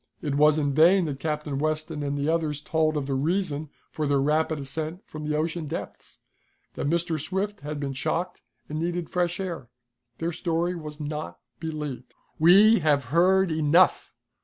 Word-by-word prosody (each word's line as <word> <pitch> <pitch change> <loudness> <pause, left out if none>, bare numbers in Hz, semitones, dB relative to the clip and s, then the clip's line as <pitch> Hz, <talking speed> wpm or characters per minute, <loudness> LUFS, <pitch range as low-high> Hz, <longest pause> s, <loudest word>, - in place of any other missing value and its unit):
It 145 -3 -3
was 150 +2 +4
in 145 -2 0
vain 170 +5 +5
that 140 -3 -4
Captain 150 -2 -3
Weston 155 0 -2
and 145 0 -2
the 140 +1 -1
others 160 -3 0
told 155 0 0
of 145 - -2
the 135 - -2
reason 155 +1 -1 0.2
for 155 -2 -2
their 140 -1 +2
rapid 155 +3 +1
ascent 155 +6 -4
from 155 0 -8
the 150 0 0
ocean 160 0 -2
depths 160 - -7 0.6
that 140 - -2
Mr. 170 -1 0
Swift 195 +6 -3
had 150 0 -5
been 140 -1 -3
shocked, 170 +7 -2 0.3
and 155 +1 -4
needed 170 0 -2
fresh 175 -1 0
air. 170 -10 -5 0.5
Their 165 +1 -2
story 170 +1 -1
was 155 -3 -8
not 150 - -5 0.2
believed. 150 -6 -6 0.2
"We 200 +7 +7
have 145 -2 +2
heard 185 +1 +4
enough!" 160 +3 +3
155 Hz, 170 wpm, -26 LUFS, 150-170 Hz, 0.6 s, We